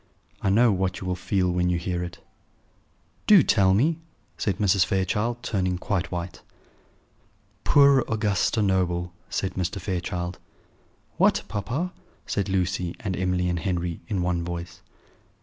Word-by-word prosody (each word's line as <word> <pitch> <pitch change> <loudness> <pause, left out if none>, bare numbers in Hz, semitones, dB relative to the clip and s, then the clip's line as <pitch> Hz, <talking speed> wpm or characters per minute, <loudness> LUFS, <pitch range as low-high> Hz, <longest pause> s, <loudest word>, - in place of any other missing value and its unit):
I 100 - +1
know 115 +4 +5
what 95 -1 -1
you - - -7
will 90 0 -1
feel 90 0 0
when 90 0 +1
you 90 - +1
hear 90 +1 -2
it." 85 - -7 1.1
"Do 200 -7 +8
tell 95 -3 +4
me," 155 +9 +2 0.4
said 100 - -1
Mrs. 100 -3 +3
Fairchild, 105 +6 -1
turning 95 -3 -1
quite 90 -1 -2
white. 85 -1 -5 1.2
"Poor 140 -1 +6
Augusta 105 0 +1
Noble!" 90 -2 0 0.2
said 95 - -2
Mr. 95 +2 -2
Fairchild. 90 -1 -3 0.8
"What, - - +3
papa?" 115 - -3 0.3
said 100 -1 -2
Lucy 90 -2 -1
and 95 -3 -2
Emily 90 -1 0
and 90 -1 -1
Henry, 85 -3 -2
in 95 -5 -1
one 90 -1 0
voice. 85 0 -6
95 Hz, 140 wpm, -25 LUFS, 90-100 Hz, 1.2 s, Do